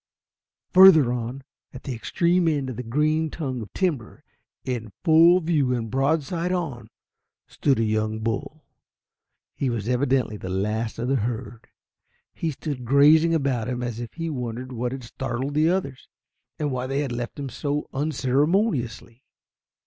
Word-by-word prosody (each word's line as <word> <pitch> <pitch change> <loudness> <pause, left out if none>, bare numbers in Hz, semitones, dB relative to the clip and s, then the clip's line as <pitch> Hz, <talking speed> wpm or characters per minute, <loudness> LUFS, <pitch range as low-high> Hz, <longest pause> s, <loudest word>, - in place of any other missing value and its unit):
Further 170 -9 +8
on, 125 +3 -5 0.3
at 130 - -9
the 135 - -4
extreme 170 +9 +1
end 140 -5 0
of - - -7
the 125 - -4
green 155 +6 0
tongue 135 -6 -4
of 105 - -9
timber, 155 - -2 0.4
in 120 -4 -4
full 170 +1 +6
view 150 -7 +1
and 115 -3 -4
broadside 160 +5 0
on, 140 -11 -3 0.6
stood 140 -2 0
a 115 - +1
young 110 0 0
bull. 115 +8 -4 0.9
He 135 - -2
was 115 -3 -3
evidently 125 -3 +1
the 95 - -7
last 105 +4 -2
of 120 +2 -3
the 135 +1 +2
herd. 115 0 -4 0.7
He 165 - -2
stood 145 -3 -5
gazing 150 +6 +5
about 135 -7 0
him 125 -1 -3
as 120 -2 -4
if 120 -1 -7
he 165 -1 -4
wondered 125 -3 -5
what 125 0 -3
had 135 -1 -6
startled 130 +3 -4
the 155 +2 +3
others, 155 -8 -2 0.5
and 150 -2 -2
why 130 0 -3
they 135 +2 -1
had 140 -4 -3
left 120 0 -5
him 140 -2 -5
so 145 +4 -3
unceremoniously. 140 - 0
130 Hz, 155 wpm, -24 LUFS, 120-155 Hz, 0.9 s, Further